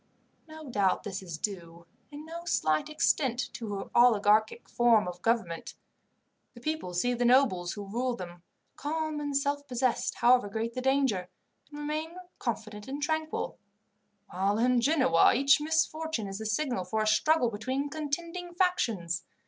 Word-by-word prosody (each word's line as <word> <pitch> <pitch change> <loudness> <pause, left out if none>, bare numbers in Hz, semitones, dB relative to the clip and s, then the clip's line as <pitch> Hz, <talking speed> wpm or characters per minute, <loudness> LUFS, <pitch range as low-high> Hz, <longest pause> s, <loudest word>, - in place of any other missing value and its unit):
No 315 -1 -10
doubt 200 -7 +1
this 195 -1 -5
is 170 -4 -7
due, 170 -3 -5 0.2
in 295 +1 -9
no 335 +1 -7
slight 155 - +1
extent, 265 -4 +1
to 215 -3 -5
her 195 - -6
oligarchic 220 -2 +4
form 230 -4 +3
of 180 0 -7
government. 225 -8 -1 0.8
The - - -11
people 305 - -3
see 245 +8 +1
the 245 0 -1
nobles, 240 -9 +3
who 205 -1 -7
rule 240 +5 -2
them, 175 -4 -9 0.3
calm 310 +1 -3
and 290 -1 -1
self 285 0 -1
possessed, 250 -1 0
however 245 -3 +4
great 225 +3 -3
the 255 - -3
danger, 260 -9 +1 0.4
and 295 - -10
remain 305 +3 -4 0.2
confident 215 -3 -4
and 275 +2 -4
tranquil; 315 +1 -2 0.7
while 195 +3 0
in 245 +1 +3
Genoa 260 - +4
each 275 +3 +4
misfortune 315 -4 0
is 195 +1 -6
the 220 - -4
signal 245 -2 -1
for 215 +4 -1
a - - -1
struggle 240 +4 +3
between 260 +7 -2
contending 335 +4 -4
factions. 225 - 0
245 Hz, 155 wpm, -29 LUFS, 205-295 Hz, 0.8 s, oligarchic